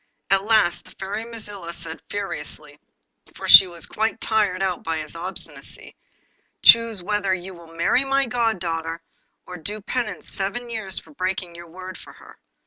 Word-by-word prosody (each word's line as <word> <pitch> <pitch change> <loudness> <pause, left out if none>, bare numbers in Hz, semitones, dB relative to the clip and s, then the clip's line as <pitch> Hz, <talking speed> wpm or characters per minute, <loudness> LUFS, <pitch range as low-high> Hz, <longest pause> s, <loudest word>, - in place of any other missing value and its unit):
At 195 0 +4
last 215 -5 +3
the - - -14
Fairy 205 +3 -4
Mazilla 205 -6 -6
said 160 -1 -6
furiously 150 -6 -5 0.6
(for - - -6
she 190 - +11
was 170 -2 -8
quite 220 +1 -1
tired 210 -4 +1
out 185 -2 -1
by 165 0 -1
his 155 +1 -4
obstinacy), 180 +3 -7 0.7
'Choose 230 -5 +7
whether 200 -1 +1
you 185 +1 -7
will 170 -2 -14
marry 170 +10 +3
my 275 0 +2
goddaughter, 170 -9 -1 0.4
or 180 - -8
do 205 +6 -2
penance 215 -1 -3
seven 220 +5 -3
years 205 -5 -3
for - - -8
breaking 185 -7 -3
your 170 0 -10
word 185 +1 -9
to - - -13
her. - - -16
190 Hz, 160 wpm, -23 LUFS, 170-220 Hz, 0.7 s, she